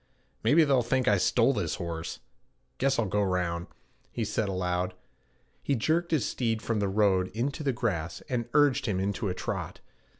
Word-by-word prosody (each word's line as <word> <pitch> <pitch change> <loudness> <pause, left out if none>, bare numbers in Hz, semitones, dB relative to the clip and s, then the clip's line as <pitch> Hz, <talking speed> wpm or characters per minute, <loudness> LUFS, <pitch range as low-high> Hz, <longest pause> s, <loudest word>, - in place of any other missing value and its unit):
'Maybe 160 +3 +5
they'll 135 -4 +3
think 125 +2 0
I 100 - +5
stole - - +3
this - - -1
horse. 85 -1 -5 0.6
Guess 135 +1 +2
I'll 115 - +2
go 105 +2 0
round,' 90 -3 -1 0.4
he 115 - -2
said 105 0 -1
aloud. 90 -1 -1 0.7
He 140 - 0
jerked 165 +8 +1
his 155 -9 +1
steed 115 -3 -1
from 115 -1 -1
the 100 -1 0
road 95 -2 +3
into 135 +7 -2
the 140 -2 +1
grass, 95 -10 -2
and 120 -4 -3
urged 140 -3 +4
him 95 -4 0
into 100 +2 -1
a 90 - -2
trot. - - -4
110 Hz, 175 wpm, -28 LUFS, 95-130 Hz, 0.7 s, Maybe